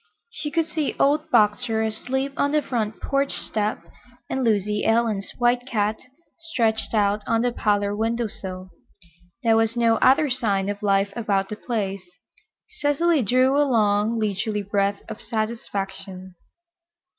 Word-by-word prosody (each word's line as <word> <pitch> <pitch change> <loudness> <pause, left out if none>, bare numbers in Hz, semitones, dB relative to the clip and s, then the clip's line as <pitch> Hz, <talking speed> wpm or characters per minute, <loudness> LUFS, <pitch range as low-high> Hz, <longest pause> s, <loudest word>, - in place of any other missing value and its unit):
She 305 -6 -4
could 330 +1 +1
see 310 -2 -2
old 300 +3 +2
Boxer 220 0 +2
asleep 265 +5 -2
on 285 +1 0
the 300 -1 +2
front 220 -4 -2
porch 275 0 0
step 215 0 -2 0.5
and 265 - -1
Lucy 210 -2 +1
Ellen's 225 -3 +1
white 245 +1 +1
cat 215 -3 0 0.4
stretched 230 -10 -1
out 205 0 +2
on 230 0 +2
the 245 - +1
parlor 205 -3 0
window 230 +2 0
sill. 185 -3 -7 0.7
There 225 -1 +4
was 225 +1 +1
no 230 -1 +3
other 285 +4 +4
sign 205 -6 0
of 205 0 -4
life 200 -1 +1
about 200 -4 0
the 210 - -4
place. 200 -4 -3 0.8
Cecily 295 +2 +2
drew 255 +4 +3
a 290 - +4
long, 220 -4 +2
leisurely 210 0 -1
breath 200 0 0
of - - -8
satisfaction. 195 -4 -4
220 Hz, 145 wpm, -23 LUFS, 205-250 Hz, 0.8 s, There